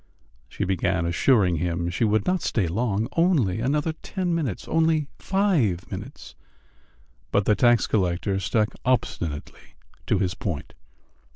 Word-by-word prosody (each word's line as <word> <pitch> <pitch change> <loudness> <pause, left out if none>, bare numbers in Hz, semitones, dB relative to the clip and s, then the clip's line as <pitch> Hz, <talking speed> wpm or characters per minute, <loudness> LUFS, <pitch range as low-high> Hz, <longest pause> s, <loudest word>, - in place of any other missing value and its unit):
She - - -4
began 95 -1 0
assuring 90 0 +3
him 85 +1 -1
she 90 - -1
would 105 -1 +1
not 185 -2 +1
stay 105 - 0
long, 110 +3 -1
only 155 - +2
another 150 +6 0
ten 180 +2 -3
minutes, 145 - -2
only 160 -1 +2
five 160 - +1
minutes; - - -8 1.0
but 100 - +2
the 105 - +4
tax 120 +2 +4
collector 95 0 0
stuck 105 +3 +1
obstinately 85 - -2 0.3
to - - +2
his 95 -1 0
point. 85 -8 -5
110 Hz, 130 wpm, -25 LUFS, 90-150 Hz, 1.0 s, the